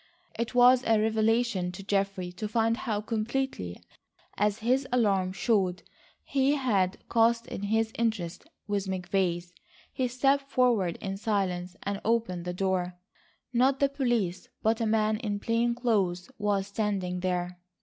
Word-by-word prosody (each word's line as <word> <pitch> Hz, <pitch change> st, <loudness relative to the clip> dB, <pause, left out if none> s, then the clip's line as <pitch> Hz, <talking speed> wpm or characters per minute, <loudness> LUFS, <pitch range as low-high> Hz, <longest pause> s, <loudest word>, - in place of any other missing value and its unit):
It 235 Hz, +1 st, -4 dB
was 250 Hz, +1 st, +6 dB
a 225 Hz, -3 st, +3 dB
revelation 220 Hz, -3 st, +1 dB
to 195 Hz, -, -8 dB
Geoffrey 195 Hz, -2 st, -1 dB
to 210 Hz, +4 st, -5 dB
find 225 Hz, +1 st, +1 dB
how 210 Hz, -3 st, -2 dB
completely, 220 Hz, -, -2 dB, 0.6 s
as 210 Hz, 0 st, +1 dB
his 255 Hz, +4 st, +1 dB
alarm 200 Hz, -6 st, +2 dB
showed, 190 Hz, -1 st, 0 dB, 0.4 s
he 275 Hz, +1 st, +2 dB
had 200 Hz, -9 st, +1 dB
cast 230 Hz, 0 st, +3 dB
in -, -, -6 dB
his 220 Hz, +2 st, +1 dB
interests 195 Hz, -7 st, -1 dB, 0.2 s
with 205 Hz, -2 st, -2 dB
McVay's. 180 Hz, -2 st, -1 dB, 0.4 s
He 255 Hz, -, 0 dB
stepped 275 Hz, +3 st, +1 dB
forward 235 Hz, -10 st, +2 dB
in 195 Hz, 0 st, -3 dB
silence 185 Hz, -4 st, -1 dB
and 200 Hz, 0 st, -3 dB
opened 220 Hz, -6 st, 0 dB
the 180 Hz, -, -2 dB
door. 185 Hz, -1 st, -1 dB, 0.6 s
Not 260 Hz, +3 st, +3 dB
the 280 Hz, -, +3 dB
police, 240 Hz, -10 st, -1 dB
but 225 Hz, +2 st, +2 dB
a 225 Hz, -, +1 dB
man 215 Hz, 0 st, +2 dB
in 210 Hz, -3 st, -3 dB
plain 235 Hz, +2 st, +1 dB
clothes 200 Hz, -5 st, 0 dB
was 205 Hz, -2 st, +1 dB
standing 200 Hz, -3 st, -2 dB
there. 180 Hz, -1 st, -2 dB
210 Hz, 145 wpm, -28 LUFS, 185-235 Hz, 0.6 s, was